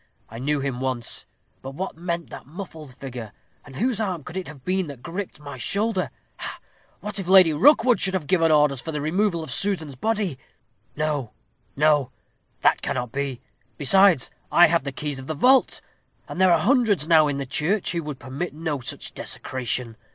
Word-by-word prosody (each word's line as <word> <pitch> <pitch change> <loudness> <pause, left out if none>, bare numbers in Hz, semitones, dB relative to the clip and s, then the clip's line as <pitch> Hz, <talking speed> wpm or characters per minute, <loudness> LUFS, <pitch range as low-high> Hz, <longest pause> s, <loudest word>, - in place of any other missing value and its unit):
I 115 - -9
knew 145 +2 0
him 135 -2 -2
at - - -7
once. 130 -3 -2 0.3
But 135 +1 -8
what 190 +5 -4
meant 170 0 -4
that - - -10
muffled 160 -5 -9
figure; 125 -6 -7 0.3
and 135 - -13
whose 235 - 0
arm 185 -7 -2
could 175 - -9
it 190 -1 -4
have 140 -4 -12
been 185 -1 0
that 140 -4 -10
griped 185 -2 -6
my 145 -3 -9
shoulder? 200 - 0 0.3
Ha! - - -6 0.4
what 210 -1 -3
if 190 - -5
Lady 185 -4 +7
Rookwood 245 - +5
should 190 0 +2
have 175 -5 -2
given 165 -1 +3
orders 150 -4 +3
for 160 - -5
the 150 - -3
removal 170 +3 0
of 155 - -6
Susan's 160 -2 0
body? 200 - -2 0.6
No, 150 -6 -2 0.4
no; 145 -3 +3 0.5
that - - +3
cannot 125 -2 -3
be. 135 -2 -3 0.4
Besides, 180 0 +5 0.2
I 175 - +7
have 165 -3 +1
the 140 - -2
keys 145 +1 -4
of 130 - -9
the 155 - -3
vault; 260 - +4 0.5
and 185 - -4
there 185 -1 +6
are 170 - +6
hundreds 220 - +2
now 160 -2 +6
in 145 -1 -2
the 140 - -3
church 165 +10 0
who 170 - -2
would 150 -3 -6
permit 135 +7 -5
no 155 -3 -3
such 120 - -6
desecration. 125 -2 -3
155 Hz, 190 wpm, -24 LUFS, 135-185 Hz, 0.6 s, Lady